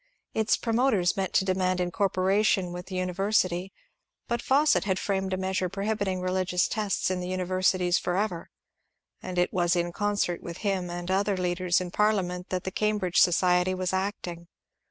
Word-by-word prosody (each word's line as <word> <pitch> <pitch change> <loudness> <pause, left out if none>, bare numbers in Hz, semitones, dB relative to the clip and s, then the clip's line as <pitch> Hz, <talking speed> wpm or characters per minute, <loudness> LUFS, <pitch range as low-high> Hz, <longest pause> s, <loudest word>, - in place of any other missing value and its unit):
Its 220 +1 +2
promoters 225 -6 +1
meant 190 -1 -2
to 190 - +2
demand 185 -1 0
incorporation 190 +1 +1
with 180 0 -7
the 190 - -6
univer 185 +2 -2
sity, 185 -2 +1 0.6
but 235 0 -1
Fawcett 290 +4 +3
had 190 -2 0
framed 190 -1 -1
a 185 - 0
measure 190 -1 -1
prohibiting 195 -1 -2
religious 185 -1 0
tests 205 -3 -1
in 185 - -1
the 180 - -4
universities 185 0 +1
forever, 180 -1 -2 0.7
and 185 -1 -6
it 180 0 +1
was 175 -1 +2
in 175 0 0
concert 205 -3 -1
with 170 0 -7
him 190 -3 0
and 175 +1 -4
other 200 +1 +1
leaders 180 0 +1
in 180 -1 -5
Parliament 185 -4 0
that 185 -1 -2
the 190 - -4
Cambridge 210 -4 0
society 180 +1 +3
was 185 0 -2
acting. 185 -3 -3
185 Hz, 165 wpm, -27 LUFS, 180-200 Hz, 0.7 s, Fawcett